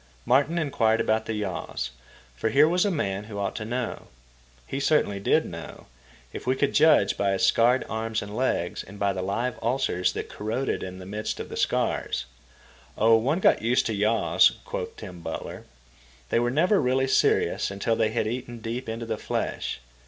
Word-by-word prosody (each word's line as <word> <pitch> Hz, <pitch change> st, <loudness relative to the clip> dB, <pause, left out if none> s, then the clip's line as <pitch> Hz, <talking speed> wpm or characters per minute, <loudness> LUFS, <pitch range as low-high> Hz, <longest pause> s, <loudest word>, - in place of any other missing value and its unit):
Martin 140 Hz, +7 st, +3 dB
inquired 115 Hz, -8 st, +2 dB
about 110 Hz, 0 st, 0 dB
yaws, 95 Hz, -, -3 dB, 0.4 s
for 110 Hz, -, -1 dB
here 145 Hz, +5 st, +5 dB
was 180 Hz, +4 st, +2 dB
a -, -, +2 dB
man 105 Hz, -, -2 dB
who 105 Hz, -1 st, -8 dB
ought 100 Hz, -1 st, -2 dB
to 110 Hz, -, -4 dB
know. 120 Hz, +2 st, -4 dB, 0.6 s
He 135 Hz, -, -4 dB
certainly 140 Hz, -8 st, +2 dB
did 100 Hz, -, +2 dB
know, -, -, -9 dB, 0.5 s
if -, -, -7 dB
we 130 Hz, -, +3 dB
could 140 Hz, +1 st, 0 dB
judge 150 Hz, -10 st, +5 dB
by 100 Hz, -1 st, +1 dB
his 95 Hz, -, +2 dB
scarred 120 Hz, +3 st, +3 dB
arms 110 Hz, 0 st, -2 dB
and 105 Hz, +1 st, -8 dB
legs 115 Hz, -8 st, -1 dB
and 100 Hz, +2 st, -12 dB
by 100 Hz, -1 st, +1 dB
the 95 Hz, -, -3 dB
live 115 Hz, +7 st, -2 dB
ulcers 120 Hz, -6 st, 0 dB
that -, -, -4 dB
corroded 115 Hz, +6 st, -2 dB
in 95 Hz, 0 st, -6 dB
the 95 Hz, -, -9 dB
midst 105 Hz, +3 st, -4 dB
of -, -, -6 dB
the -, -, -6 dB
scars. 60 Hz, -, 0 dB, 0.7 s
Oh, 115 Hz, +1 st, +5 dB
one 130 Hz, +8 st, +1 dB
got -, -, +4 dB
used 120 Hz, +3 st, +2 dB
to 110 Hz, -, -1 dB
yaws, 105 Hz, +2 st, +3 dB
quoth -, -, -5 dB
Tom 90 Hz, -1 st, -9 dB
Butler. 80 Hz, -1 st, -6 dB, 0.6 s
They -, -, +2 dB
were 120 Hz, 0 st, +1 dB
never 180 Hz, -, +3 dB
really 130 Hz, 0 st, +2 dB
serious 130 Hz, -, +2 dB
until 100 Hz, +3 st, -1 dB
they 110 Hz, -1 st, +2 dB
had 110 Hz, 0 st, -1 dB
eaten 120 Hz, +1 st, -4 dB
deep 115 Hz, +2 st, -5 dB
into 115 Hz, +1 st, -4 dB
the 110 Hz, -1 st, -3 dB
flesh. -, -, -3 dB
115 Hz, 185 wpm, -26 LUFS, 100-130 Hz, 0.7 s, here